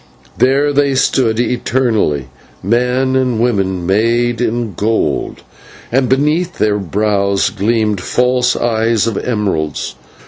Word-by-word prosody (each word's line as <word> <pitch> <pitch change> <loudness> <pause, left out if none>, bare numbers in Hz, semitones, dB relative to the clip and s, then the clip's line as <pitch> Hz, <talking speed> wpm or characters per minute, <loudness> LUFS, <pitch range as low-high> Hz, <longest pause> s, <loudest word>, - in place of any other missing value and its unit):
There 140 +3 +2
they 140 -1 +2
stood 120 -4 +1
eternally, 115 - 0 0.4
men 125 +5 +1
and 125 -3 +1
women 95 -7 0
made 115 +4 +1
in 115 -3 -1
gold, 105 -7 -1 0.5
and 130 0 +1
beneath 155 +6 +1
their 105 -1 +1
brows 100 +1 0
gleamed 105 -1 0
false 125 +3 +1
eyes 115 -2 +1
of 115 -3 -2
emeralds. 100 - -2
115 Hz, 110 wpm, -15 LUFS, 105-125 Hz, 0.5 s, There